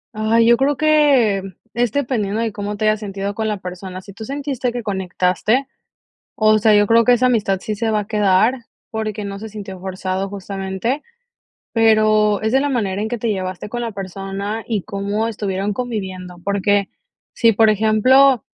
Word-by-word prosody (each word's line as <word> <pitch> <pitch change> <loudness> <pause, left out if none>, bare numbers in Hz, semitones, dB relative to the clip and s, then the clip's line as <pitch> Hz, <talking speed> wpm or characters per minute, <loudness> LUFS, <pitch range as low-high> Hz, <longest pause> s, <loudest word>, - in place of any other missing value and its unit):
Ay, 220 +2 +3
yo 235 +1 +5
creo 275 +2 +1
que 285 -10 +3 0.3
es 240 -1 0
dependiendo 225 -7 -1
de 230 -1 -1
cómo 205 0 -4
te 215 - -1
hayas 215 0 +2
sentido 200 -1 -4
con 220 +1 -2
la 210 -1 -1
persona. 185 0 -7
Si 200 +1 -13
tú 220 +3 -8
sentiste 270 -2 -3
que 240 0 -5
conectaste, 190 +5 0 0.7
o 215 0 +4
sea, 215 0 +4
yo 205 0 +5
creo 230 +2 +4
que 245 - +6
esa 250 +1 +3
amistad 205 -6 +1
sí 215 - -3
se 225 +2 -1
va 215 - +1
a 205 - -5
quedar, 210 +2 +3 0.4
porque 215 -1 -3
no 200 0 -6
se 220 - -7
sintió 195 -3 -8
forzado 190 +1 -3
justamente, 195 +6 -3 0.7
pero 215 -2 +3
es 220 0 0
de 265 - +5
la 285 +1 0
manera 205 -6 -1
en - - -2
que 240 +1 -4
te 230 - -1
llevaste 185 -1 -4
con 240 +2 -4
la 230 -1 -3
persona 195 +2 -5
y 220 -4 -1
cómo 200 +3 -2
estuvieron 205 -2 -2
conviviendo, 190 -7 -5
porque 200 0 +1 0.5
si, 230 -2 +4
por 220 +1 +4
ejemplo, 220 +5 +4
215 Hz, 185 wpm, -19 LUFS, 195-230 Hz, 0.7 s, que